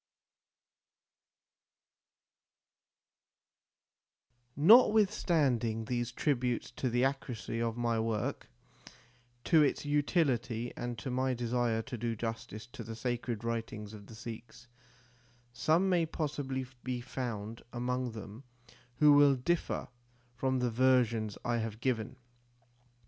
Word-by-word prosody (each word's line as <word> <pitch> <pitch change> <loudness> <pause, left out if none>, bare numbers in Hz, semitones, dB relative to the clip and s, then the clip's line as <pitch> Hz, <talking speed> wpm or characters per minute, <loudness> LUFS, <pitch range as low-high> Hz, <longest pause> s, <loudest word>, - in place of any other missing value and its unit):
1 145 - -2
Notwithstanding 170 - +4
these 120 0 -2
tributes 125 -2 -1
to 130 - -2
the 120 +2 +2
accuracy 125 -4 -3
of 115 0 -1
my 120 -1 0
work, 110 -1 -2 0.9
to 160 -2 +5
its 145 0 +1
utility 135 -6 0
and 120 -1 -4
to 110 +6 -5
my 130 +1 0
desire 120 -1 0
to 120 - -6
do 115 0 -1
justice 115 -1 -5
to 120 -1 -9
the 115 +1 -7
sacred 120 -1 -3
writings 115 -2 -4
of 100 -2 -11
the 115 - -11
Sikhs, 115 0 -9 0.9
some 160 +9 +2
may 175 -3 +2
possibly 140 -4 -3 0.2
be 125 0 -2
found 115 -3 -5
among 125 0 -2
them 110 +3 -9 0.5
who 150 +2 +6
will 145 -1 +6
differ 165 +7 -1 0.5
from 130 +2 0
the 125 -1 0
versions 120 -4 +2
I 120 -1 +1
have 110 -1 -4
given. 125 0 -1
120 Hz, 110 wpm, -32 LUFS, 115-135 Hz, 0.9 s, who